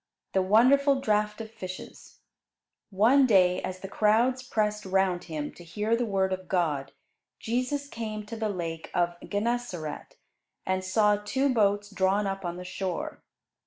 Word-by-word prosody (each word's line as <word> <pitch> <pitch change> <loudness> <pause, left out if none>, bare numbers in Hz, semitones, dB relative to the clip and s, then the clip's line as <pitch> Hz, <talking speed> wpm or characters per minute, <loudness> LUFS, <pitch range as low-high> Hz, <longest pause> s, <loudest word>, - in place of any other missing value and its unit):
"] - - -56
THE 190 - +3
WONDERFUL 265 +8 +4
DRAUGHT 210 -2 0
OF 220 -1 -8
FISHES 185 -4 -9 0.7
One 235 +7 +5
day, 185 -4 +4
as 185 0 -5
the 195 - -5
crowds 225 +6 +2
pressed 210 -4 -1
round 190 -2 +1
Him 155 -3 -5
to 175 - -13
hear 210 +7 -1
the 240 0 -1
Word 190 -2 +1
of 185 -1 -6
God, 150 -7 0 0.5
Jesus 255 +5 -2
came 215 -4 -5
to 230 - -7
the 220 -1 -2
Lake 165 -4 -4
of 175 0 +1
Gennesaret 205 -7 -3 0.5
and 185 0 0
saw 210 +2 +3
two 260 +6 0
boats 205 -2 +2
drawn 195 +1 +1
up 195 0 -3
on 175 0 -4
the 180 - -7
shore. 185 -1 -4
205 Hz, 160 wpm, -28 LUFS, 185-225 Hz, 0.7 s, One